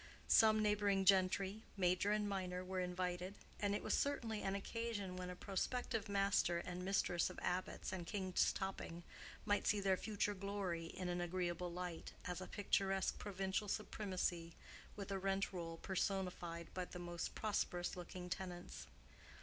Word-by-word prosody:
Some 220 -1 +7
neighboring 205 -2 +3
gentry, 195 +2 +4 0.2
major 185 +2 +3
and 210 0 +2
minor, 185 -2 -2
were 185 0 -2
invited; 180 +1 -1 0.2
and 205 -1 +2
it - - -2
was - - +1
certainly 230 -7 +1
an 195 0 0
occasion 205 -2 -2
when 180 0 -4
a 180 - -4
prospective 225 +3 -1
master 195 -3 +3
and 180 +1 -4
mistress 180 -3 +2
of - - -9
Abbott's 185 +1 -1
and 175 -2 -4
King's 190 -3 +2
Topping 190 -3 -4 0.4
might 205 -1 +2
see 210 - +4
their 195 -1 +3
future 205 0 0
glory 190 -4 -2
in 185 +2 -4
an 175 0 0
agreeable 175 0 -1
light, 180 -1 -4
as 180 0 -2
a 185 - -5
picturesque 195 -1 +1
provincial 195 0 -1
supremacy 185 -5 -1 0.4
with 200 -1 -5
a 195 - 0
rent 195 +1 +1
roll 165 -2 -4
personified 180 -3 -2
by 185 -1 -2
the 180 - -8
most 175 -1 -3
prosperous 180 -4 0
looking 180 0 -6
tenants. 180 -1 -5
190 Hz, 155 wpm, -40 LUFS, 180-200 Hz, 0.4 s, Some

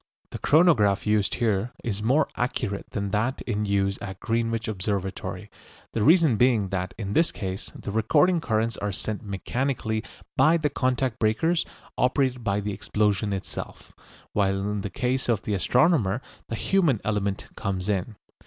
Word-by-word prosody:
The - - -6
chronograph 135 - +4
used 105 -2 +2
here 110 0 0
is 105 -3 -2
more 130 +8 +3
accurate 105 -5 -2
than 100 -2 -3
that 115 +5 0
in 105 -3 -1
use 100 -1 +1
at 95 -2 -6
Greenwich 115 0 -1
Observatory, 100 -2 -3 0.4
the 115 - 0
reason 155 - +5
being 115 -5 +3
that 95 0 -3
in 100 -3 -4
this 165 +1 +3
case 95 -1 -5
the - - -6
recording 135 - +3
currents 110 -4 0
are 105 0 -2
sent 105 +2 -4
mechanically 110 +2 -2 0.3
by 165 +2 +5
the 150 -3 0
contact 130 -3 0
breakers 160 +11 +1 0.3
operated 125 -1 +1
by 100 -2 +1
the 105 0 -3
explosion 105 +1 0
itself, 95 -1 -6 0.4
while 95 -1 +2
in 105 -1 -2
the 100 - -4
case 125 +6 -1
of 110 -4 +1
the 105 - -2
astronomer 115 - +3 0.3
the 115 - -2
human 160 - +2
element 100 -2 -1
comes 95 -1 -3
in. 105 +2 -1
110 Hz, 155 wpm, -26 LUFS, 100-125 Hz, 0.4 s, reason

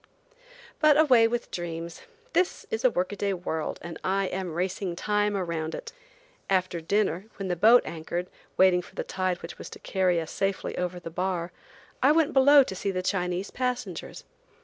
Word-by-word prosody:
But 305 -1 +5
away 250 -7 +6
with 240 +1 -3
dreams. 170 -1 -5 0.3
This 365 0 +1
is 220 +1 -2
a 255 - +6
work 185 -4 -1
a - - -4
day 200 -1 -1
world 160 -3 -3
and 170 -1 -7
I 195 +1 +1
am 185 -3 -4
racing 185 0 -2
Time 210 +2 0
around 165 -4 -3
it. 470 -1 -8 0.6
After 185 -3 +1
dinner, 195 +1 0
when 195 -2 -5
the 180 - +1
boat 225 +8 +6
anchored, 170 +2 -4 0.3
waiting 185 -1 +5
for - - -16
the - - -2
tide 185 -1 -2
which - - -8
was - - -8
to - - -10
carry 185 -3 +1
us 160 -1 -5
safely 195 -1 -2
over 180 0 -3
the 165 -1 -8
bar, 180 0 -2 0.5
I 275 - +6
went 320 -2 +2
below 280 +1 +7
to 190 - -6
see 195 - -2
the 185 -1 -2
Chinese 180 0 -1
passengers. 250 -1 -4
185 Hz, 185 wpm, -27 LUFS, 175-215 Hz, 0.6 s, below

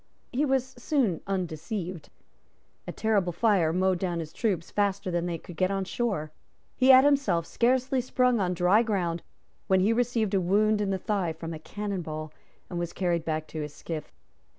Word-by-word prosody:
He 275 +4 +1
was 265 -2 +1
soon 240 - +1
undeceived. 180 -1 -4 0.8
A - - -3
terrible 205 -5 +1
fire 175 -3 +2
mowed 185 +1 +1
down 175 -2 -1
his 160 -2 -6
troops 190 -6 -1
faster 200 -2 0
than 175 0 -1
they 170 -1 -2
could 170 +2 -11
get 185 +3 +1
on 195 0 -1
shore. 195 -9 -2 0.4
He 255 - +2
had 260 0 +9
himself 265 - +2
scarcely 255 +4 +1
sprung 250 -1 +2
on 180 -2 0
dry 180 +5 +4
ground 180 -7 -1 0.5
when 190 -1 +4
he 210 +4 +3
received 230 -3 0
a 195 - +3
wound 210 +4 +2
in 205 - 0
the 195 - 0
thigh 190 -4 -1
from 165 +1 -6
a 155 - -6
cannon 200 +3 -4
ball, 155 -1 -6 0.3
and 175 - -4
was 175 -1 -3
carried 175 -3 0
back 155 -1 -2
to 155 - -5
his 150 -1 -6
skiff. 160 -3 -6
190 Hz, 185 wpm, -27 LUFS, 170-220 Hz, 0.8 s, had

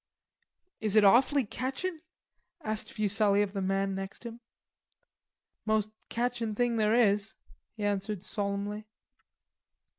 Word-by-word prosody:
"Is 215 -2 -1
it 215 - +7
awfully 255 +6 +5
catchin'?" 270 - -3 0.6
asked 215 0 -4
Fuselli 205 -1 +3
of 200 -1 -4
the 195 - -2
man 195 +1 0
next 195 +4 -6
him. 235 0 -7 1.2
"Most 215 -1 +1 0.2
catchin' 235 -2 -1
thing 240 0 +1
there 215 0 +3
is," 210 -2 +2 0.4
he 210 - -4
answered 205 -1 -1
solemnly. 205 +1 -3
215 Hz, 115 wpm, -30 LUFS, 200-235 Hz, 1.2 s, it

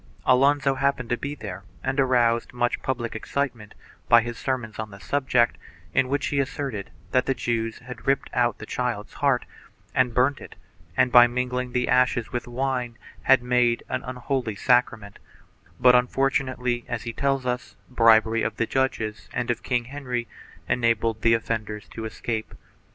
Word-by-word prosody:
Alonso 140 +2 +4
happened 135 -2 0
to - - +3
be 145 +3 -5
there 100 -8 -7 0.2
and 130 +2 -1
aroused 120 -3 +2
much 120 0 0
public 120 -4 -3
excitement 120 -3 -3 0.3
by 115 -1 +7
his 120 0 -5
sermons 120 -4 -3
on 110 0 -4
the 100 - -11
subject, 125 -1 +1 0.3
in 135 - +3
which 140 +1 0
he 145 - 0
asserted 135 -6 -3 0.2
that 130 -1 +2
the 135 - +1
Jews 115 -2 -2
had 125 0 -11
ripped 135 0 +2
out 120 -2 +1
the 110 - -8
child's 115 -3 -3
heart, 135 -3 +1 0.5
had 120 -2 +2
burnt 130 +3 +2
it - - -11 0.4
and, 130 -1 +3
by 120 0 +9
mingling 125 0 -2
the 125 0 +1
ashes 125 -2 +2
with 120 - -3
wine, 125 -1 -2 0.2
had 130 -2 +4
made 125 -1 +2
an 130 - -2
unholy 125 -2 -3
sacrament, 115 -3 +1 0.6
but 125 0 +7
unfortunately, 125 -1 +1
as 120 -2 -4
he 115 - -5
tells 135 0 0
us, 125 0 -3
bribery 115 -2 +4
of 110 - -2
the 115 - +1
judges 110 -5 -2
and 120 0 -1
of 120 - -3
King 120 -2 -1
Henry 125 -3 -4 0.4
enabled 115 -2 +1
the 115 0 +5
offenders 110 -2 -4
to 110 - -7
escape. 110 0 -4
125 Hz, 165 wpm, -25 LUFS, 115-130 Hz, 0.6 s, by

